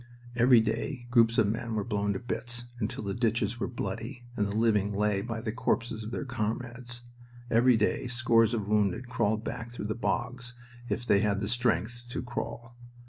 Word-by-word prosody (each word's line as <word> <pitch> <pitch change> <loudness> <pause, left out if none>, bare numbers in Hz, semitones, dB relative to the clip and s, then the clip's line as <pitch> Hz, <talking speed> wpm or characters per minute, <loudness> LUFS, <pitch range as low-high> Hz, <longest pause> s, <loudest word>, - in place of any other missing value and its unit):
Every 120 -1 +6
day 115 +3 -2
groups 115 -2 +5
of 110 - +5
men 115 +2 -2
were 105 - 0
blown 105 -2 0
to 95 - -3
bits, 120 0 -4
until - - -2
the 100 -1 -2
ditches 115 -1 0
were - - -1
bloody 120 +2 -5
and 105 -3 +1
the 100 +1 -2
living 105 -3 +3
lay 105 -1 +2
by 115 +1 -4
the 110 - -2
corpses 115 -2 -1
of 110 - -5
their 125 - -3
comrades. 120 0 -3 0.5
Every 120 +1 +5
day 110 +3 +1
scores 120 -2 +3
of 105 -3 -2
wounded 105 +3 +1
crawled 110 -3 +1
back 115 -1 -5
through 120 -3 -6
the 110 - -1
bogs, 125 +2 -2 0.3
if 120 - -2
they 100 - +4
had 100 -1 +1
the 100 - -2
strength 120 0 0
to 125 - -3
crawl. 120 -1 -5
115 Hz, 190 wpm, -29 LUFS, 105-120 Hz, 0.5 s, Every